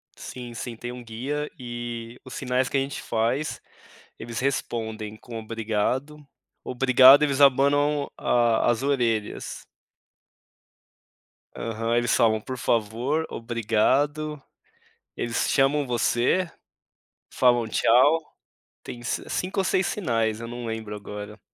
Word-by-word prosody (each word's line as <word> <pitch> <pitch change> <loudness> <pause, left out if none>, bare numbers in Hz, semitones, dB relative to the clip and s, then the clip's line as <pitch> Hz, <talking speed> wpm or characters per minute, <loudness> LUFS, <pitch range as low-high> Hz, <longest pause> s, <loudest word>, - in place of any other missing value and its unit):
Sim, 120 -2 -8
sim. 115 +1 -6
Tem 120 +2 -6
um 125 0 -9
guia 135 +6 -4
e 120 -1 -6
os - - -10
sinais 125 -1 0
que - - 0
a - - +3
gente 135 +1 -3
faz, 120 +7 -1 0.6
eles 115 +1 -5
respondem 110 -5 -3
com 115 0 -8
obrigado. 115 +7 -2 0.4
Obrigado, 130 +2 +6
eles 145 -1 +1
abanam 140 +2 +4
a 120 -2 +2
as 120 +2 -2
orelhas. 120 -6 -1 1.9
Aham. 115 +1 -2
Eles 120 0 +2
falam: 110 -1 +3
"Por 130 +3 -6
favor, 120 +7 0
obrigado". 135 +6 0 0.8
Eles 115 -1 -1
chamam 140 +1 +2
você, 125 +8 +1 0.8
falam: 120 -2 +3
"Tchau". 130 +8 +4 0.6
Tem 120 - -8
s 120 - -3
5 190 +2 -1
ou - - 0
6 185 0 +1
sinais, 115 - -1
eu 115 - -6
não 120 0 -6
lembro 110 -2 -5
agora. 105 0 -8
120 Hz, 120 wpm, -25 LUFS, 115-140 Hz, 1.9 s, Obrigado